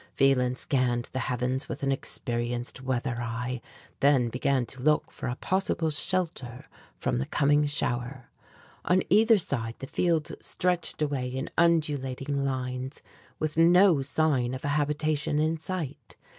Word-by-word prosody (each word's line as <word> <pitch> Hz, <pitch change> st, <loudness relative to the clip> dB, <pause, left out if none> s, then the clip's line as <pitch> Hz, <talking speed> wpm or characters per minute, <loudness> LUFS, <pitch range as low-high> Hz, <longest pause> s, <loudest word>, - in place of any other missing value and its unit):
Phelan 130 Hz, -2 st, +3 dB
scanned 125 Hz, -2 st, 0 dB
the 130 Hz, -, -1 dB
heavens 125 Hz, +1 st, -1 dB
with -, -, -5 dB
an 135 Hz, -, +2 dB
experienced 120 Hz, -1 st, -3 dB
weather 125 Hz, -2 st, -2 dB
eye, 120 Hz, +1 st, -3 dB, 0.4 s
then 135 Hz, -4 st, +4 dB
began 130 Hz, +1 st, +1 dB
to 130 Hz, +2 st, -12 dB
look 150 Hz, +2 st, +2 dB
for -, -, -6 dB
a 125 Hz, -, -2 dB
possible 175 Hz, -1 st, 0 dB
shelter 155 Hz, -7 st, -2 dB, 0.3 s
from -, -, -1 dB
the 65 Hz, -, -2 dB
coming 145 Hz, +1 st, +3 dB
shower. 130 Hz, -3 st, -2 dB, 0.5 s
On 180 Hz, +1 st, +3 dB
either 220 Hz, +3 st, +6 dB
side, 115 Hz, -, -2 dB
the -, -, -7 dB
fields 165 Hz, +2 st, 0 dB
stretched 180 Hz, -3 st, -1 dB
away 140 Hz, -4 st, -1 dB
in 130 Hz, +3 st, -4 dB
undulating 145 Hz, -4 st, +1 dB
lines, 130 Hz, 0 st, -3 dB, 0.3 s
with 155 Hz, 0 st, -2 dB
no 175 Hz, -1 st, +6 dB
sign 135 Hz, -3 st, +1 dB
of 130 Hz, -, -7 dB
a -, -, 0 dB
habitation 150 Hz, 0 st, 0 dB
in 155 Hz, +1 st, +1 dB
sight. 150 Hz, -7 st, -5 dB
135 Hz, 145 wpm, -28 LUFS, 125-155 Hz, 0.5 s, either